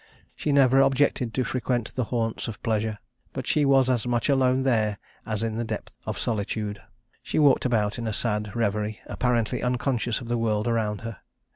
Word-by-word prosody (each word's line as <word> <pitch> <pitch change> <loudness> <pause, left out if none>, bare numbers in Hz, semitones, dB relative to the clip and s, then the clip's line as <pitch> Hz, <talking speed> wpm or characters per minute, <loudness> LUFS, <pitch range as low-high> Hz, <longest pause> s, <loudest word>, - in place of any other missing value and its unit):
She 150 - -1
never 135 -2 +5
objected 135 -2 +2
to 130 - +1
frequent 120 -2 -2
the 125 - -1
haunts 115 -1 -2
of 115 - -7
pleasure, 110 -1 0 0.4
but 130 -2 -4
she 150 -2 +2
was 135 -2 +5
as 125 -3 +1
much 120 +3 0
alone 130 -1 +3
there 110 -5 +1 0.3
as 110 0 -2
in 110 -1 -2
the - - 0
depth 110 -2 -6
of - - -2
solitude. 105 -2 -2 0.4
She - - -4
walked 145 -4 +4
about 110 -3 +1
in 115 - -3
a - - 0
sad 105 -1 -1
reverie, 105 -1 -1
apparently 120 -3 0
unconscious 125 -2 0
of 120 - -9
the 120 0 0
world 110 -1 0
around 110 -3 0
her. 115 -4 -7
115 Hz, 185 wpm, -26 LUFS, 110-130 Hz, 0.4 s, never